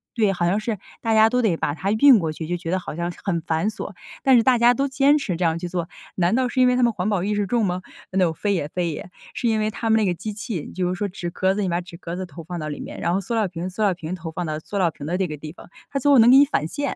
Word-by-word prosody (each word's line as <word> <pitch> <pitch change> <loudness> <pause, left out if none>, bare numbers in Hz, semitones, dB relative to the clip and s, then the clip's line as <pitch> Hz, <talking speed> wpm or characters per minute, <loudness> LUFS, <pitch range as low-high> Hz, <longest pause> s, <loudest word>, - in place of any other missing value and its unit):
对， 215 -4 +2
好 175 -2 -1
像 190 +5 +2
是 215 -1 -3 0.2
大 225 - 0
家 220 0 +6
都 250 +1 +1
得 200 -7 +2
把 145 - -1
它 195 +5 -2
运 255 +1 +7
过 160 -3 -2
去， 160 - -6
就 175 - -1
觉 170 -1 -6
得 185 - +2
好 180 - -7
像 170 +1 -2
是 - - -14
很 180 -4 0
繁 160 +6 0
琐。 220 - -7 0.3
但 265 -2 +6
是 230 - +4
大 255 -2 +4
家 240 +1 +5
都 275 +2 0
坚 275 +2 +3
持 190 - -3
这 180 - 0
样 165 0 +1
去 175 - -4
做， 175 -2 -3 0.3
难 185 +4 +2
道 255 -1 +1
是 260 - -2
因 250 - +6
为 250 - +3
他 250 - +2
们 235 - +4
环 185 0 -2
保 190 -4 0
意 210 - 0
识 205 -1 0
重 235 -1 +1
吗？ 180 0 -2 0.3
No， 185 -3 +2
非 200 +4 -1
也 150 -6 -1
非 175 0 -2
也， 170 - -7 0.2
是 240 - -2
因 220 -1 +2
为 215 - 0
他 225 +1 -3
们 220 - +5
那 215 - +2
个 180 - +1
机 210 +5 -6
器， 210 -6 -5
就 180 -1 -1
是 180 - -1
说 205 +2 -2
纸 180 -2 -5
壳 190 +2 +1
子， 210 - -1
你 190 - 0
把 170 0 0
纸 175 -1 -12
壳 170 -1 -6
子 185 - -4
投 165 -1 -11
放 175 +1 -6
到 155 - -4
里 145 - -5
面， - - -8
然 170 - 0
后 195 - +1
塑 215 - -5
料 215 -3 +1
瓶， 175 +1 -5
塑 185 +4 -6
料 200 -3 +3
瓶 165 0 -6
投 165 -2 -7
放 175 +2 -4
到 155 -1 -3
塑 200 - -6
料 175 -4 +2
瓶 145 - -9
的 175 +4 -1
这 190 - 0
个 150 - -5
地 155 +2 -8
方， - - -15 0.2
它 275 - -2
最 285 +2 +4
后 270 - +7
能 230 +2 +7
给 260 - +8
你 285 - +8
返 215 - -1
现。 285 +9 -3
190 Hz, 370 characters per minute, -23 LUFS, 170-225 Hz, 0.3 s, 给